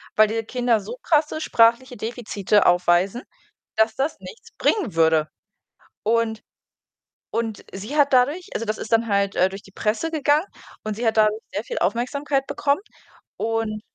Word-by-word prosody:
weil 215 0 +6
diese 225 +1 -2
Kinder 240 -1 +1
so 225 +5 -8
krasse 310 -1 +1
sprachliche 235 +1 +3
Defizite 210 -3 0
aufweisen, 180 +6 +2 0.5
dass 220 0 +3
das 275 +4 -2
nichts 460 - -12
bringen 310 - +1
würde.“ 160 -1 +3 0.8
Und 225 0 0 0.9
und 225 -3 -3
sie 210 +10 -6
hat 285 -2 +4
dadurch 285 +8 +2
also, 230 - -3
das 215 0 -2
ist 220 - -7
dann 225 0 +3
halt, 200 -1 +1
äh, 185 - +4
durch 195 +1 -9
die 195 - -17
Presse 225 - -1
gegangen 300 +2 +2 0.4
und 215 -1 -3
sie 240 - -3
hat 220 - +1
dadurch 215 0 +3
sehr 205 - -2
viel - - -6
Aufmerksamkeit 270 +8 -1
bekommen 285 +3 0 0.6
und 225 -1 -2
225 Hz, 160 wpm, -23 LUFS, 210-265 Hz, 0.9 s, weil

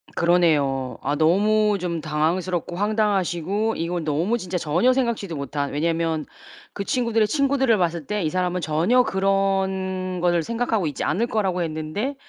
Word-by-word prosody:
그러네요. 150 -7 +2
아 145 +2 0
너무 210 +6 +3
좀 170 -2 -3
당황스럽고 165 +3 -1
황당하시고 205 0 0
이건 170 +1 -2
너무 165 +10 0
진짜 180 -2 -3
전혀 175 +9 +2
생각지도 235 -9 -1
못한 140 0 -3
왜냐면 165 0 -1 0.5
그 200 - -4
친구들의 230 -1 +1
친구들을 270 -2 +2
봤을 170 -4 -1
때 210 -2 -1
이 155 - 0
사람은 180 +1 -1
전혀 170 +12 +2
그런 190 -2 0
거를 175 -1 +2
생각하고 225 -3 -1
있지 145 - -4
않을 230 +5 0
거라고 190 -6 0
했는데 160 - -3
180 Hz, 345 characters per minute, -23 LUFS, 165-210 Hz, 0.5 s, 너무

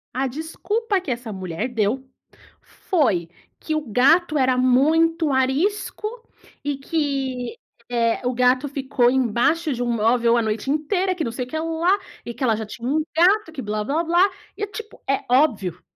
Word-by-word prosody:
A 265 +2 0
desculpa 390 - -2
que 365 - -8
essa 240 -2 -3
mulher 185 +3 -4
deu, 240 +3 -1 0.6
foi 215 - 0 0.3
que 310 - -3
o 310 - 0
gato 300 - +3
era 260 -2 +2
muito 310 +5 +3
arisco, 290 +12 0 0.6
e 285 -1 -2
que, 275 -4 -2 0.3
eh, 235 0 0
o 250 - 0
gato 250 +3 +2
ficou 265 -3 +1
embaixo 265 +6 +1
de 245 - -4
um 240 - 0
móvel 230 +1 +3
a - - +3
noite 220 +3 -2
inteira, 360 +6 0
que 340 - -2
não 230 - -2
sei 245 +2 -4
o - - -17
que 315 - -4
lá, 330 +4 +1 0.3
e 235 - -5
que 265 - -6
ela 230 -3 +3
já 220 0 -4
tinha 230 +3 -7
um 305 +4 +1
gato, 365 +2 +4
que 300 -4 -6
blá-blá-blá, 280 - 0 0.4
e 415 - -1
tipo, 430 +1 -9
é 275 - +1
óbvio, 245 - +2
265 Hz, 170 wpm, -22 LUFS, 240-325 Hz, 0.6 s, gato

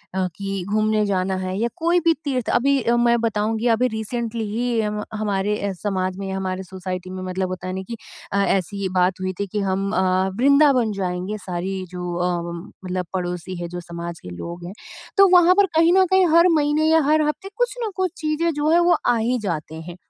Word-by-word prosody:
अ, 185 -1 +1
कि 195 -2 -4
घूमने 215 0 +2
जाना 190 -1 0
है 185 0 -3
या 235 - +1
कोई 340 +2 +2
भी 335 -1 +3
तीर्थ 260 -5 -2
अभी 275 +2 +2
अ, 235 +1 +2
मैं 235 0 +3
बताऊँगी 220 +1 0
अभी 235 +2 +3
रिसेंटली 225 0 -3
ही 235 +1 0
हम 210 0 -2
हमारे 210 -1 -1
अ, - - -2
समाज 185 -1 -2
में 195 0 -5
या 190 0 -3
हमारे 190 0 -3
सोसाइटी 185 0 -6
में 185 0 -6
मतलब 185 0 -2
होता 185 0 -5
नहीं 190 +1 -4
कि 230 +4 -6 0.4
अ, 200 0 +3
ऐसी 195 +1 -1
बात 180 +1 +2
हुई 185 0 -2
थी 200 - -1
कि 210 +2 -3
हम 195 +1 -1
अ, 185 0 +2
वृंदावन 275 -3 +4
जाएँगे 185 +3 -2
सारी 185 +2 -3
जो 180 -1 -4 0.2
अम 170 +1 -4
मतलब 180 0 -2
पड़ोसी 180 0 -3
हैं 175 - -3
जो 175 +1 -5
समाज 170 -1 -7
के - - -10
लोग 170 - -7
हैं। 180 - -7 0.4
तो 395 0 +8
वहाँ 360 0 +6
पर 405 0 +5
कहीं 330 +2 +5
न 380 0 +5
कहीं 380 -1 +5
हर 340 - +7
महीने 300 0 +2
या 320 0 +5
हर 305 +2 +3
हफ़्ते 300 +5 -3
कुछ - - 0
न 445 - -1
कुछ 375 -2 0
चीज़ें 315 +1 0
जो 295 +1 0
हैं 335 +2 +5
वो 350 0 +4
आ 240 - +4
ही 240 +3 +1
जाते 160 -6 -4
हैं। 175 +1 -9
205 Hz, 215 wpm, -22 LUFS, 185-255 Hz, 0.4 s, तो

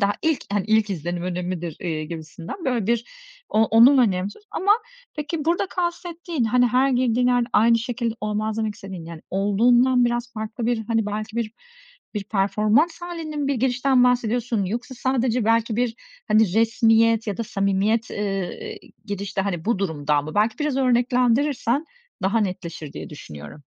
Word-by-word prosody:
Daha 200 0 +3
ilk 320 -3 0
hani, 200 -2 0
ilk 220 -1 +2
izlenim 175 -1 -3
önemlidir, 175 -2 -4
eee, 160 -4 -3
gibisinden 165 - -8
böyle 245 -6 0
bir 235 0 +1 0.4
o 220 +1 +3
onun 240 +6 +6
önemsiz 200 - 0
ama 400 +2 +3 0.4
peki, 300 +1 -3
burada 340 +4 +1
kastettiğin, 345 -5 -3
hani, 245 +2 +3
her 255 +3 +3
girdiğin 250 -1 +2
yerde 245 -1 +2
aynı 230 +1 +5
şekilde 235 -1 -2
olmaz 215 +1 -2
demek 220 -1 -1
istediğin, 190 -5 -8
yani, 165 -1 -9
olduğundan 240 +6 +3
biraz 240 0 -1
farklı 220 +1 -4
bir` 235 -2 0
hani, 225 -2 +1
belki 215 +2 -4
bir 225 -2 -2 0.6
bir 205 -1 -3
performans 215 - +1
hâlinin 310 -5 -4
bir 280 - +1
girişten 255 +1 +1
mi 245 - +6
bahsediyorsun 240 -3 +1
yoksa 240 +7 -4
sadece 250 -2 0
belki 225 0 +2
bir, 240 -1 0 0.3
hani, 215 -3 +3
resmiyet 225 0 +3
ya 205 -3 -2
da 230 - -3
samimiyet, 200 +3 0
ııı, 195 -3 -2 0.5
gidişte, 200 -2 -3
hani, 185 -4 -2
bu 230 -2 +1
durumdan 150 -6 0
mı? 155 - -7
Belki 215 +2 +1
biraz 300 -3 -1
örneklendirirsen 250 +2 +2 0.4
daha 195 +5 +2
netleşir 180 -6 -4
diye - - -8
düşünüyorum. 75 - -10
225 Hz, 160 wpm, -23 LUFS, 200-250 Hz, 0.6 s, onun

